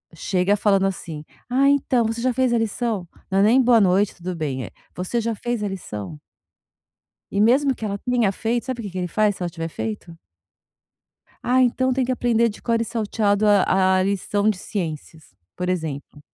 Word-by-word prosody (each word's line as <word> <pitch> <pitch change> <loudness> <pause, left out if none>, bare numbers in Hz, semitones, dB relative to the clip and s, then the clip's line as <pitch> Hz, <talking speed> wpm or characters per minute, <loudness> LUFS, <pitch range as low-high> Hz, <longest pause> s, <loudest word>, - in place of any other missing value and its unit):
chega 185 +4 +1
falando 195 -2 +2
assim: 165 -5 -6 0.3
"Ah, 270 +3 +3
então 265 -4 +2
você 225 +1 -2
já 250 +1 +1
fez 260 0 +1
a 240 - +3
lição?" 225 -3 -2 0.2
Não 195 0 +1
é - - +5
nem 235 +5 +5
boa 240 -2 +5
noite 195 0 +2
tudo 180 +1 -5
bem? 140 -6 -3 0.3
"Você 185 +6 -2
já 230 0 -2
fez 240 0 -3
a - - 0
lição?" 105 - -7 1.1
E 200 - 0
mesmo 265 +5 +4
que 225 - -8
ela 200 -1 -2
tenha 240 -3 +1
feito, 230 +4 -2
sabe 255 -2 -3
o - - -7
que 200 - -5
que 185 - -6
ele 180 -1 -2
faz 210 +3 +1
se - - -7
ela 175 - -2
tiver 165 0 -5
feito? 110 - -6 1.3
Ah, 255 +1 +3
então 255 +1 +2
tem 260 0 +1
que 255 - -1
aprender 235 -2 +2
de 210 - -9
cor 230 -1 +1
e - - +1
salteado 215 -2 0
a 190 -2 +4
a - - +3
lição 200 +2 0
de 215 - +1
ciências, 160 -5 -6 0.2
por 180 0 -3
exemplo. 155 -5 -4
205 Hz, 200 wpm, -22 LUFS, 180-235 Hz, 1.3 s, é